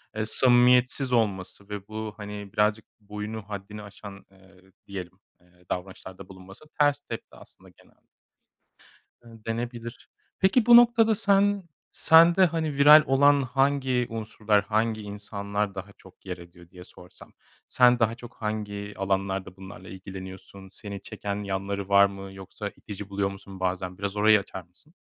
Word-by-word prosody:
eee, 110 - -2
samimiyetsiz 125 +2 +4
olması 100 -3 -1
ve 100 -1 -7
bu, 110 0 -6
hani, 105 -1 -8
birazcık 105 +1 +1 0.2
boyunu, 105 +2 -6
haddini 105 +1 -7
aşan, 100 0 -12
eee, 95 -1 -22 0.3
diyelim, 95 -3 -8 0.2
eee, 90 0 -27
davranışlarda 95 0 -7
bulunması 95 +8 -14
ters 145 -1 +3
tepti 115 -5 -9
aslında - - -18
genel - - -26 1.2
ııı, 115 -2 -16
denebilir. 120 +1 -6 0.3
Peki, 205 +5 +3
bu 240 - +8
noktada 230 -2 +5
sen 200 0 +2 0.3
sende, 170 +3 +6
hani, 160 -3 -2
viral 150 +2 +8
olan 140 +1 +4
hangi 135 -1 0
unsurlar, 110 -2 -1
hangi 110 +2 -1
insanlar 100 0 -4
daha 95 +1 -7
çok 95 +1 -20
yer 90 -1 -5
ediyor 85 0 -16
diye 90 0 -13
sorsam 90 - -16 0.3
sen 125 -1 +4
daha 115 0 +1
çok 120 0 -13
hangi 105 -1 -5
alanlarda 95 -1 -2
bunlarla 95 +1 -12
ilgileniyorsun? 95 0 -10
Seni 100 -2 -8
çeken 100 0 -5
yanları 100 0 -4
var 100 0 +6
mı, 100 0 -7
yoksa 95 +2 -7
itici 105 -1 -9
buluyor 100 0 -1
musun 95 -1 -11
bazen? 90 0 -3
Biraz 100 0 -4
orayı 105 0 +5
açar 95 -1 -8
mısın? 90 - -23
105 Hz, 145 wpm, -26 LUFS, 95-120 Hz, 1.2 s, bu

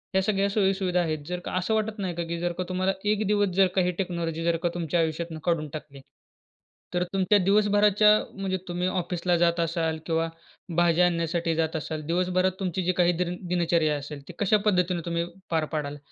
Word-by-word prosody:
या 190 - +4
सगळ्या 200 0 +1
सोयीसुविधा 190 -3 +1
आहेत. 155 -2 -1
जर 180 0 -3
का - - -4
असं 185 +5 0
वाटत 215 0 -1
नाही 180 -3 -2
का 170 - -2
की 170 0 -3
जर 175 0 -1
का 185 - -1
तुम्हाला 185 +1 0 0.2
एक 215 0 0
दिवस 205 -1 +2
जर 190 -1 +6
का 190 - +4
ही 180 0 +1
टेक्नॉलॉजी 170 -3 -2
जर 170 0 +2
का 175 - +2
तुमच्या 170 -1 -1
आयुष्यातुन 160 0 -2
काढून 165 -4 0
टाकली, 140 -3 -8 0.9
तर 180 0 +1
तुमच्या 195 +2 +3
दिवसभराच्या 210 +1 +4 0.2
म्हणजे 190 -1 -2
तुम्ही 180 +1 -1
ऑफिसला 180 -1 0
जात 170 0 +2
असाल 165 -1 0
किंवा 165 0 0 0.5
भाज्या 175 0 +4
आणण्यासाठी 170 -1 0
जात 160 0 0
असाल. 155 0 -3
दिवसभरात 185 +2 +1
तुमची 185 -1 -2
जी 185 - +3
काही 175 -1 +4
दिन 180 0 -1
दिनचर्या 170 -3 +2
असेल. 145 0 -8
ती 180 - -9
कशा 205 +1 +4
पद्धतीने 180 -3 +2
तुम्ही 170 0 -1 0.3
पार 160 -2 +1
पाडाल? 145 -1 -3
175 Hz, 195 wpm, -26 LUFS, 165-190 Hz, 0.9 s, जर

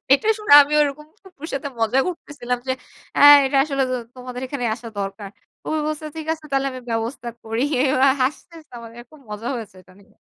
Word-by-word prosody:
এটা 280 +10 +3
শুনে 425 -8 0
আমি 285 - -6
ওরকম 295 +1 -1 0.2
ফুফুর 365 -5 -11
সাথে 280 +1 -3
মজা 225 +4 +2
করতেছিলাম 290 -8 -4
যে - - +2 0.5
আ - - +2 0.2
এটা 270 +1 0
আসলে 275 -3 -1 0.3
তোমাদের 250 0 -8
এখানে 255 -2 -5
আসা 230 0 -10
দরকার। 195 +1 -5 0.3
ফুফু 315 - -2
বলছে 310 0 -4
ঠিক 315 -1 -6
আছে 320 -1 -8
তাহলে 275 0 0
আমি 255 - -8
ব্যবস্থা 230 +2 -3
করি 225 +2 -3 0.3
ওরা 270 0 +4
হাসতে 300 +6 -3 0.6
খুব 305 -2 -17
মজা 210 +3 -5
হয়েছে 215 -4 -9
এটা 185 - -21
নিয়ে। 200 - -25
270 Hz, 180 wpm, -21 LUFS, 235-300 Hz, 0.6 s, ওরা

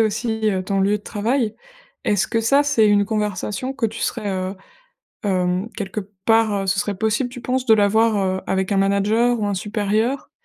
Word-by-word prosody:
aussi, 220 0 0
heu, 185 -2 -1
ton 195 +1 -1
lieu 200 +2 +2
de - - -22
travail. 220 +2 -1 0.5
Est-ce 200 -2 +2
que 225 - 0
ça, 275 +6 +4
c'est 280 -7 +3
une 205 0 +4
conversation 210 +3 -2
que 265 - -3
tu 225 +1 -7
serais, 215 -4 -2
heu, 185 0 -2 0.7
hem 185 +1 0
quelque 200 0 -4 0.3
part, 225 -1 +4
heu, - - -5
ce 195 - +1
serait 205 -1 -1
possible 220 +5 0
tu 250 - -9
penses 255 0 -1
de 225 - +7
l'avoir, 215 +2 +3
heu, 190 -1 0
avec 190 +1 -1
un - - +1
manager 210 +5 +2
ou 210 - 0
un 205 - -1
supérieur? 215 +6 -1
210 Hz, 195 wpm, -21 LUFS, 195-225 Hz, 0.7 s, de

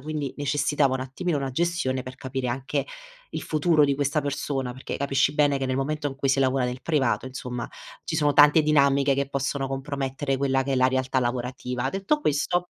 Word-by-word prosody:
quindi 150 -1 -4
necessitava 145 -1 +1
un 130 - -2
attimino 150 +6 -2
una 135 -1 -3
gestione 130 -3 -1
per 130 0 -8
capire 130 -1 -4
anche 130 +2 -2 0.5
il - - -4
futuro 155 0 +3
di 140 - +2
questa 145 +2 +1
persona, 140 -2 -2
perché 130 +2 -6
capisci 140 +1 +1
bene 145 -2 +3
che 135 - -2
nel 130 0 -1
momento 145 +2 -1
in 135 - -8
cui 135 0 -1
si 135 - +2
lavora 130 -1 +2
nel 125 +1 -3
privato, 135 -8 +1
insomma, 125 -2 -5 0.4
ci - - -3
sono 145 -1 +3
tante 150 +2 +7
dinamiche 140 -2 +3
che 140 0 -1
possono 140 0 -2
compromettere 135 0 -2
quella 135 -1 +1
che 135 +1 -2
è - - +1
la 130 0 +4
realtà 130 0 0
lavorativa; 125 +1 -2
detto 195 +11 0
questo 175 - 0
135 Hz, 195 wpm, -25 LUFS, 130-145 Hz, 0.5 s, tante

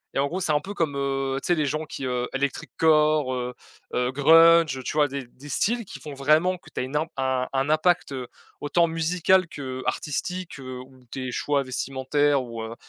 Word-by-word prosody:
et - - +1
en 140 - +2
gros, 180 +6 -3
c'est 175 -4 0
un 150 - +3
peu 200 +6 -8
comme, 160 -6 0
heu, 135 -1 -1
tu - - -5
sais, 175 - +3
les 155 -2 0
gens 155 +3 -2
qui, 140 -3 -6
heu, 125 -1 -1
Electric 135 0 -2
Core, 155 -4 +3
heu 125 0 -4 0.4
heu, 125 0 +1
Grunge, 165 +1 +6
heu, 130 - -7
tu - - -3
vois 150 -1 +4
des 140 -1 -5
des 130 +4 -14
styles 230 - 0
qui - - -10
font 150 - -8
vraiment 155 +7 +2
que - - -17
tu - - -5
as - - 0
une 130 +3 -6
im 155 +2 +1
un 130 -1 0
un 135 +1 0
impact, 175 +1 +2
heu, 130 -2 -5 0.3
autant 170 +4 +2
musical 170 +3 +2
qu'artistique, 145 +5 -4
heu, 130 -1 -7
ou 130 0 -16
tes 130 -2 -4
choix 140 +2 0
vestimentaires 135 +2 0
ou, 115 -2 -7
heu, 110 +1 -6
140 Hz, 220 wpm, -25 LUFS, 130-160 Hz, 0.4 s, Grunge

